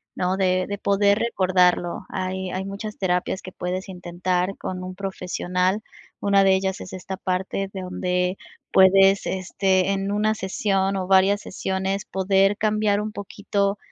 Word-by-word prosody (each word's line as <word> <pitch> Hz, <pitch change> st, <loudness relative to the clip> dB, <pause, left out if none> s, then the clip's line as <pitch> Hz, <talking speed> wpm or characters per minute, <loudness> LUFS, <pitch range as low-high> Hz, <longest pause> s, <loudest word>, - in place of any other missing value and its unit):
¿no?, 180 Hz, +1 st, 0 dB
de 185 Hz, -1 st, +2 dB
de 200 Hz, -, -3 dB
poder 200 Hz, +1 st, +2 dB
recordarlo. 185 Hz, -5 st, +1 dB
Hay 185 Hz, 0 st, -3 dB
hay 190 Hz, +1 st, -3 dB
muchas 205 Hz, +2 st, -6 dB
terapias 180 Hz, 0 st, -1 dB
que 185 Hz, -, -9 dB
puedes 185 Hz, +2 st, -4 dB
intentar 180 Hz, +1 st, -2 dB
con 185 Hz, 0 st, -5 dB
un 185 Hz, 0 st, -6 dB
profesional. 185 Hz, 0 st, -1 dB, 0.4 s
Una 200 Hz, -1 st, +3 dB
de 195 Hz, -, +5 dB
ellas 190 Hz, 0 st, -2 dB
es -, -, -8 dB
esta 190 Hz, +1 st, -5 dB
parte 190 Hz, +1 st, -2 dB
de 190 Hz, -, -5 dB
donde 180 Hz, 0 st, -1 dB, 0.4 s
puedes, 195 Hz, +1 st, +6 dB
este, 190 Hz, 0 st, +1 dB
en 195 Hz, 0 st, -1 dB
una 215 Hz, +1 st, +1 dB
sesión, 195 Hz, 0 st, 0 dB
o 185 Hz, -1 st, -3 dB
varias 195 Hz, +1 st, +4 dB
sesiones 190 Hz, +1 st, -2 dB
poder 195 Hz, +1 st, +2 dB
cambiar 210 Hz, -1 st, +1 dB
un 215 Hz, 0 st, -4 dB
poquito 200 Hz, 0 st, -2 dB
190 Hz, 150 wpm, -23 LUFS, 185-200 Hz, 0.4 s, puedes